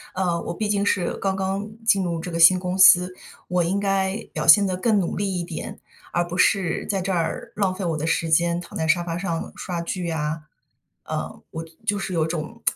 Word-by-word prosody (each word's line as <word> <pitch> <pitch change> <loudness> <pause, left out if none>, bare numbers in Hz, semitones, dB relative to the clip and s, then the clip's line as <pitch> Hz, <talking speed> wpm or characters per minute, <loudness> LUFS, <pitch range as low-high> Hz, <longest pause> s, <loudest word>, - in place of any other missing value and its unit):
呃， 175 -2 0
我 - - -4
毕 215 +2 -2
竟 200 -1 +1
是 185 -3 +1
刚 195 -1 -1
刚 195 +2 -2 0.2
进 195 -4 +3
入 170 -2 -2
这 180 +2 -6
个 165 - -3
新 180 +2 +7
公 180 0 -3
司， 185 -1 +6 0.3
我 180 0 +1
应 190 +4 0
该 195 0 0 0.2
表 155 - -2
现 195 +6 +8
得 185 - -2
更 210 +2 +2
努 175 - -2
力 200 -1 -1
一 - - -2
点， 170 -2 -7 0.3
而 175 0 +1
不 180 +1 -5
是 185 -3 +2
在 195 -2 -1
这 195 - -2
儿， 170 -2 -2
浪 195 -3 +1
费 195 - -5
我 165 -2 -1
的 155 +2 -3
时 165 0 0
间， 170 +2 +2
躺 - - -9
在 160 0 -1
沙 175 +1 +3
发 170 0 -4
上 170 -3 -3
刷 175 -2 -4
剧 170 0 -3
啊。 155 0 -3 0.6
呃， - - -5
我 160 - -5 0.2
就 205 -2 0
是 190 -1 -4
有 165 -2 +1
种 170 +8 -5
180 Hz, 240 characters per minute, -23 LUFS, 170-195 Hz, 0.6 s, 现